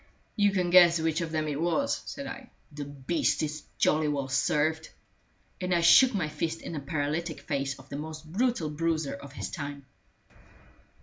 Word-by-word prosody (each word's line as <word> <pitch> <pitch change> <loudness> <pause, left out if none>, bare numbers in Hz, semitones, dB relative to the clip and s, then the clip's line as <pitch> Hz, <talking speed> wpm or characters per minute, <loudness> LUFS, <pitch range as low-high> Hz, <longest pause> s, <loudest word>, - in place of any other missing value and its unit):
"You 205 -2 +4
can 180 -3 0
guess 175 -2 +7
which 160 +1 0
of 165 -1 -3
them 155 -1 -1
it 150 0 -2
was," 175 +12 0
said 280 - -6
I. 270 -2 -8 0.2
"The 145 -1 -6
beast 145 +5 -1
is 155 0 -3 0.2
jolly 155 0 +2
well 140 -2 -2
served!" 155 +4 +1 0.7
And 180 -1 +1
I 170 - +2
shook 245 +8 +7
my 180 -6 0
fist 160 +2 -3
in - - -6
the 155 - -3
paralytic 155 +3 -3
face 135 -3 -2
of 135 - -15
the 140 - -5
most 155 +1 -7
brutal 190 -2 0
bruiser 160 -1 -1
of 140 0 -10
his - - -5
time. 145 -2 -6
160 Hz, 180 wpm, -28 LUFS, 145-175 Hz, 0.7 s, guess